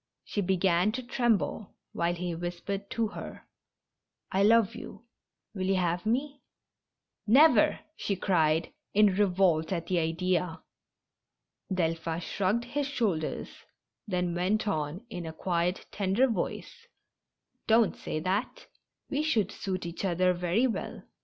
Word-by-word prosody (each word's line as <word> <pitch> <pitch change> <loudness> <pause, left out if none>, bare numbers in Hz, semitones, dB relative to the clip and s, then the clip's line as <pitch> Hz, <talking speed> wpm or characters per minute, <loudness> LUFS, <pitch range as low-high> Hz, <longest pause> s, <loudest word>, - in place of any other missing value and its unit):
She 205 - -2
began 185 0 +2
to 255 - -4
tremble, 235 -4 0 0.2
while 170 +1 0
he 175 0 -3
whispered 175 +4 -4
to 225 -2 -1
her: - - -9 0.4
" - - -52
I 190 - +2
love 220 0 +5
you. 210 - -9 0.5
Will 190 -2 -2
you 195 - +3
have 175 +1 0
me? 275 +4 -1 0.4
" - - -60
"Never! 285 +9 +6
" 315 - -44
she 200 - -2
cried, 165 -4 +1 0.2
in 210 -2 +5
revolt 185 -4 +2
at 170 -3 -1
the 180 -2 +1
idea. 175 +1 -1 1.1
Delphin 165 -2 -1
shrugged 200 +6 -1
his 280 +3 -2
shoulders, 205 - -1 0.6
then 180 -3 -1
went 190 +5 0
on 160 +2 -2
in 175 -5 -5
a 160 - -6
quiet, 175 +2 -1
tender 200 +5 +2
voice: 465 - -4 0.8
"Don't 225 -1 +4
say 155 - -4
that. 205 - -2
190 Hz, 120 wpm, -29 LUFS, 175-220 Hz, 1.1 s, Never